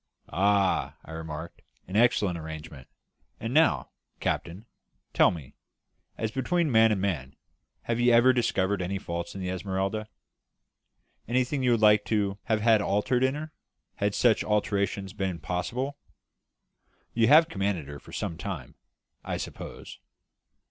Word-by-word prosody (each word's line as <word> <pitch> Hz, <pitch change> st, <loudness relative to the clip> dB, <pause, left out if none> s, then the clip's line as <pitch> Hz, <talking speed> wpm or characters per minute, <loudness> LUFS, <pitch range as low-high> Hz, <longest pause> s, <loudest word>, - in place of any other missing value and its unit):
"Ah," 100 Hz, 0 st, +2 dB
I -, -, -11 dB
remarked, 80 Hz, 0 st, -7 dB, 0.3 s
"an 95 Hz, -, -7 dB
excellent 105 Hz, -5 st, +3 dB
arrangement. 80 Hz, -4 st, -8 dB, 0.5 s
And 115 Hz, +2 st, -4 dB
now, 160 Hz, +2 st, +3 dB, 0.3 s
captain, 90 Hz, +6 st, -3 dB, 0.5 s
tell -, -, +6 dB
me, 75 Hz, -6 st, -7 dB, 0.6 s
as 110 Hz, -1 st, -2 dB
between 160 Hz, +5 st, 0 dB
man 110 Hz, -1 st, +6 dB
and 105 Hz, -, +1 dB
man, 75 Hz, -9 st, -2 dB, 0.5 s
have 115 Hz, 0 st, -1 dB
you 120 Hz, 0 st, +4 dB
ever 120 Hz, +2 st, +6 dB
discovered 100 Hz, -5 st, +1 dB
any 95 Hz, +2 st, -2 dB
faults 85 Hz, -2 st, -5 dB
in 95 Hz, -, -5 dB
the 90 Hz, -, -3 dB
Esmeralda 95 Hz, +3 st, -2 dB, 1.2 s
anything 130 Hz, +4 st, 0 dB
you 125 Hz, -, +2 dB
would 115 Hz, -2 st, +3 dB
like 105 Hz, -1 st, +6 dB
to 100 Hz, -2 st, 0 dB
have 110 Hz, -2 st, +1 dB
had 110 Hz, -1 st, +5 dB
altered 115 Hz, +6 st, +1 dB
in 130 Hz, +1 st, +2 dB
her, 155 Hz, +1 st, -6 dB, 0.5 s
had 100 Hz, 0 st, 0 dB
such 120 Hz, -3 st, +3 dB
alteration 100 Hz, -2 st, 0 dB
been 95 Hz, -3 st, -2 dB
possible? 125 Hz, -, -3 dB, 1.1 s
You 115 Hz, -1 st, +3 dB
have 155 Hz, +5 st, +7 dB
commanded 95 Hz, -, -2 dB
her 70 Hz, 0 st, -8 dB
for -, -, -15 dB
some 80 Hz, -, -4 dB
time, 85 Hz, -13 st, -6 dB, 0.5 s
I -, -, -3 dB
suppose?" -, -, -8 dB
100 Hz, 140 wpm, -27 LUFS, 90-120 Hz, 1.2 s, have